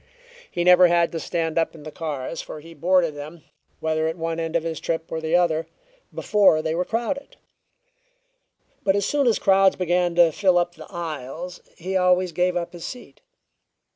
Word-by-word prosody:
He 175 - -2
never 180 0 +7
had 170 -1 +2
to 165 - -4
stand 165 -1 -1
up 165 - -1
in 155 - -12
the 155 - -8
cars, 150 -1 -5
for 155 - -9
he 165 +2 -13
boarded 170 +1 +2
them, 150 +3 -9 0.4
whether 160 0 0
at 160 +2 -3
one 165 0 -3
end 165 0 -3
of 170 - +1
his 165 -1 -4
trip 160 -1 -3
or 160 - -3
the 160 +1 0
other, 165 -2 +2 0.4
before 195 -7 +3
they 160 0 -1
were 175 +2 0
crowded; 240 +7 -3 1.5
but 195 -1 +2
as 200 -1 +1
soon 285 -3 +1
as 230 - +3
crowds 195 0 +4
began 175 -1 0
to 170 -2 +5
fill 185 +2 +2
up 175 0 +1
the - - -12
aisles 170 0 -6 0.2
he 185 +3 -4
always 180 -1 +3
gave 180 +1 0
up 170 0 -4
his 170 -2 -9
seat. 250 - -9
170 Hz, 190 wpm, -23 LUFS, 160-180 Hz, 1.5 s, never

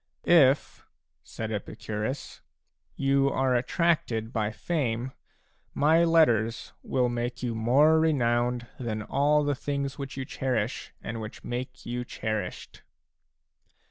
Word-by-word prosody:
" - - -50 0.3
If," 140 - -4 0.4
said 110 -1 -6
Epicurus, 110 +4 -5 0.5
"you 135 0 +2
are 130 -1 +1
attracted 125 -4 0
by 110 -2 0
fame, 125 -3 -2 0.6
my 160 +3 +4
letters 120 -10 +2
will 125 -2 +1
make 120 +1 -3
you 120 -2 -1
more 135 +8 +4
renowned 120 -5 +1
than 110 -4 -3
all 145 +5 +2
the 145 0 +1
things 140 0 -3
which 135 -1 -6
you 135 - -3
cherish 125 -4 -2
and 115 0 -5
which 110 0 -8
make 125 +1 -5
you 120 +1 -3
cherished." 110 -5 -5
125 Hz, 120 wpm, -27 LUFS, 115-140 Hz, 0.6 s, my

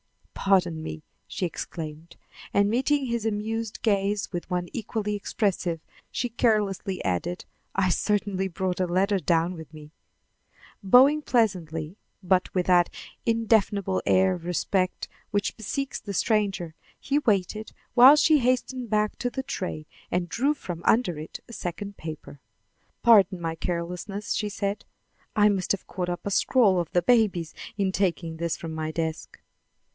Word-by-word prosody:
"Pardon 180 -5 +2
me," 155 0 -6 0.2
she 185 - -3
exclaimed; 165 -1 -6 0.4
and, 200 0 +3
meeting 265 +5 +1
his 235 -2 -2
amused 220 +1 -3
gaze 200 -1 +1
with 175 +1 -4
one 180 -1 -1
equally 215 -2 -3
expressive, 195 -5 -1 0.3
she 245 - -2
carelessly 210 -5 0
added: 95 - -2 0.3
"I 190 -1 +2
certainly 200 0 0
brought 185 +1 -2
a 185 - +1
letter 195 +3 +2
down 170 +1 +1
with 160 -3 -10
me." 150 -1 -12 0.9
Bowing 260 +9 +6
pleasantly, 180 - 0 0.3
but 185 0 +2
with 180 -1 +1
that 175 -1 +4 0.4
indefinable 210 -4 +2
air 190 0 +4
of 175 -2 -7
respect 185 +1 -1 0.2
which 205 0 -1
bespeaks 265 +5 -3
the 200 -2 -6
stranger, 195 -7 0 0.3
he 285 +1 +1
waited 215 -3 0 0.2
while 255 +4 +9
she 305 0 +5
hastened 255 -1 0
back 210 0 +1
to 245 - -1
the 265 +2 -4
tray 180 -10 -4 0.2
and 175 0 -1
drew 275 - +1
from 175 - -6
under 200 -9 +2
it 155 - -8
a 235 - -11
second 200 +2 -5
paper. 155 -3 -8 0.6
"Pardon 205 -5 +6
my 165 -1 -2
carelessness," 180 +5 -3
she 210 - -1
said. 200 0 -3 0.5
"I 210 0 +5
must 195 -3 0
have 200 - -1
caught 180 -1 -4
up 175 - -4
a 200 - -2
scrawl 200 -3 +4
of 170 - -2
the 175 - +3
baby's 200 -8 +2 0.2
in 195 -2 +1
taking 170 -4 -1
this 170 0 -2
from 160 -1 -6
my 155 0 -3
desk." 160 0 -4
195 Hz, 150 wpm, -26 LUFS, 175-220 Hz, 0.9 s, while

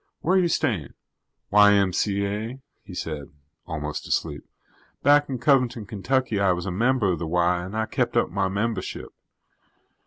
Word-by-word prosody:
Where 185 - +2
you 185 -2 +4
staying?" 110 - -1 0.6
"Y.M.C.A.," 105 +3 +2 0.2
he 95 -3 -11
said, 75 -5 -5 0.4
almost 75 -3 -4
asleep. - - -2 0.6
"Back 145 +1 +5
in 130 - -2
Covington, 125 -3 +2
Kentucky, 110 +2 -1
I 95 -2 +3
was 90 0 -4
a 95 - -2
member 115 +1 +2
of - - -4
the 85 - -3
Y 90 +1 +1
and 95 +4 -6
I 110 - 0
kept - - -1
up - - +1
my 95 +1 0
membership. 100 +1 -3
100 Hz, 150 wpm, -24 LUFS, 90-120 Hz, 0.6 s, Back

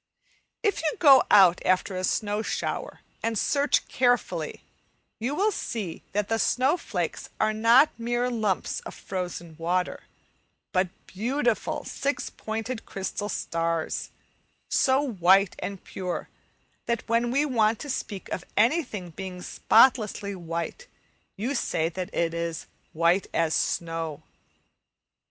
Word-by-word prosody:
If 415 -2 +1
you 310 -2 0
go 275 -5 +8
out 185 -3 +7
after 185 +2 +1
a 185 - -3
snow 205 +2 0
shower - - -3 0.2
and 225 -1 -1
search 285 +6 +2
carefully, 245 -1 0 0.6
you 250 +6 -1
will 415 +6 +2
see 215 - -4
that 205 0 0
the 225 0 0
snow 260 +7 +3
flakes - - -4
are 215 0 +2
not 230 +7 +5
mere 240 +1 0
lumps 215 -5 -1
of - - -9
frozen 175 -3 -5
water, 180 +2 -1 0.7
but 185 -2 +2 0.2
beautiful 240 +3 -1
six 280 +1 -2
pointed 225 +2 -4
crystal 200 +1 -4
stars, 165 -3 -2 0.6
so 265 +1 +4
white 195 -3 +4
and 200 -2 -5
pure 180 -2 -5 0.6
that 235 -1 -1
when 230 +1 +2
we 280 +4 +2
want 225 -5 +2
to - - -6
speak 205 -6 -4
of 180 - -3
anything 220 - +1
being 185 +1 -7
spotlessly 220 -4 +3
white, 170 - -5 0.5
you 235 +8 -1
say 165 - 0
that 180 +1 -5
it 165 -1 0
is 170 -1 -3 0.3
"white 170 +4 +2
as 165 -1 +2
snow." 165 -3 -2
210 Hz, 130 wpm, -26 LUFS, 180-245 Hz, 0.7 s, go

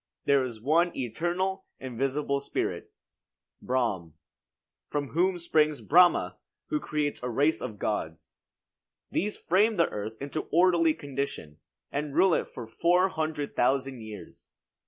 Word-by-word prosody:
There 140 -1 +4
is 120 -4 -5
one 165 +8 +2
eternal, 175 - -2
invisible 135 +3 -1
spirit, 140 - -3 0.7
Brahm, 105 -11 -1 0.7
from 145 -2 -2
whom 180 +3 +1
springs 155 -3 +2
Brahma, 175 +3 +4 0.3
who 305 - 0
creates 150 - -2
a 125 - -3
race 145 +6 +2
of 105 - -5
gods. 80 -7 -3 0.8
These 210 +3 -1
frame 210 +6 +2
the 170 -3 +3
earth 110 +2 -6
into 140 +3 -4
orderly 170 -1 +4
condition, 140 - -5 0.3
and 145 0 -3
rule 190 -2 +5
it - - 0
for 120 - -8
four 175 +11 +2
hundred 155 -4 -3
thousand 130 0 +1
years. 110 -3 -11
145 Hz, 130 wpm, -28 LUFS, 125-170 Hz, 0.8 s, rule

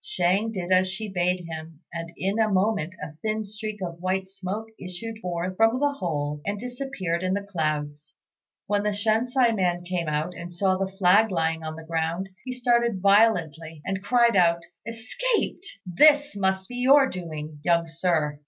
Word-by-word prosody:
Shang 190 +5 +1
did 185 -4 -4
as 185 0 +5
she 210 +3 -4
bade 180 -1 0
him, 160 -1 -8
and 165 0 -5
in 195 +4 -1
a 220 -1 +3
moment 195 -3 +1
a 150 - -6
thin 215 0 -1
streak 215 0 -5
of 170 -1 -6
white 190 +1 -1
smoke 195 +3 -5
issued 205 +5 -6
forth 180 0 -3
from 225 +3 +4
the 290 0 +2
hole 150 - -3
and 200 0 -3
disappeared 245 -8 -3
in 185 +1 0
the 200 - -2
clouds. 150 -4 -3 0.5
When 205 0 +1
the 210 0 0
Shensi 230 +3 +2
man 175 -3 0
came 175 -2 -2
out, 155 +4 -1
and 175 +1 -8
saw 185 +2 +1
the 190 0 -2
flag 195 +3 +4
lying 165 -3 0
on 155 0 -5
the 165 - -9
ground, 165 +3 -2 0.2
he 255 - -4
started 235 -4 +1
violently, 165 -7 +2
and 190 0 -2
cried 235 +1 +4
out, 170 -2 +4 0.3
"Escaped! 375 - -2 0.2
This 290 - +4
must 190 -1 0
be 245 - -7
your 270 +2 +6
doing, 155 - -6
young 170 0 +3
Sir." 165 -3 -1
185 Hz, 175 wpm, -25 LUFS, 170-220 Hz, 0.5 s, your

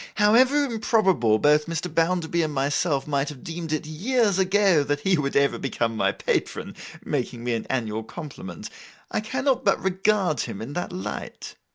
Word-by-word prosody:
However 255 +8 +4
improbable 195 - +2
both 150 +5 +3
Mr. 165 +1 -3
Bounderby 170 0 0
and 155 -1 -1
myself 140 +1 0
might 140 0 -1
have 140 -4 -10
deemed 165 -1 -5
it 155 0 -1
years 200 +5 +1
ago, 190 -4 +3
that 145 +1 -1
he 190 +3 +3
would 140 -4 -2
ever 140 0 +2
become 115 -4 -2
my 95 -2 +2
patron, - - -2 0.3
making 125 -4 -3
me 120 0 -1
an 115 - -3
annual 110 -4 -1
compliment, 120 - -8 0.4
I - - 0
cannot 260 +4 0
but - - +3
regard 190 -3 +1
him 100 - -4
in 125 +6 -6
that 175 - -3
light. 180 +1 -6
160 Hz, 170 wpm, -24 LUFS, 140-195 Hz, 0.4 s, However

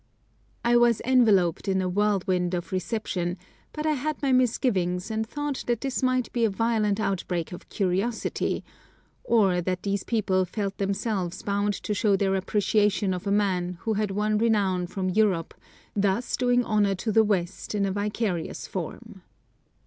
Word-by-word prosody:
I 240 0 +5
was 240 -2 +4
enveloped 215 -9 +3
in 190 -1 +2
a 185 - 0
whirlwind 185 -2 +1
of 175 0 -5
reception, 185 -2 -2 0.3
but 305 0 -5
I 310 - +3
had 300 +1 -2
my 275 -2 0
misgivings 220 -7 +1
and 220 0 -1
thought 290 +1 -3
that 240 -2 0
this 270 -1 -2
might 255 -1 0
be 235 - +1
a 225 - +4
violent 215 -1 +1
outbreak 180 -4 -2
of 175 - -10
curiosity, 200 +4 -1 0.6
or 195 -6 +3
that 185 +1 -2
these 200 -1 -1
people 195 -5 +1
felt 195 +2 -4
themselves 195 -2 -2
bound 205 0 0
to 210 - -1
show 205 0 +2
their 195 0 +1
appreciation 200 0 +1
of 180 +2 -5
a - - +1
man 185 -3 0
who 225 - 0
had 210 0 0
won 210 +2 0
renown 200 -6 +1
from 185 0 -2
Europe, 190 -5 +1 0.4
thus 205 +3 +1
doing 245 -1 +2
honour 205 -2 +2
to 215 +4 -2
the 220 +1 +5
West 195 -1 -2
in 200 -1 +1
a 195 - -1
vicarious 205 -3 -2
form. - - -7
205 Hz, 165 wpm, -26 LUFS, 185-225 Hz, 0.6 s, I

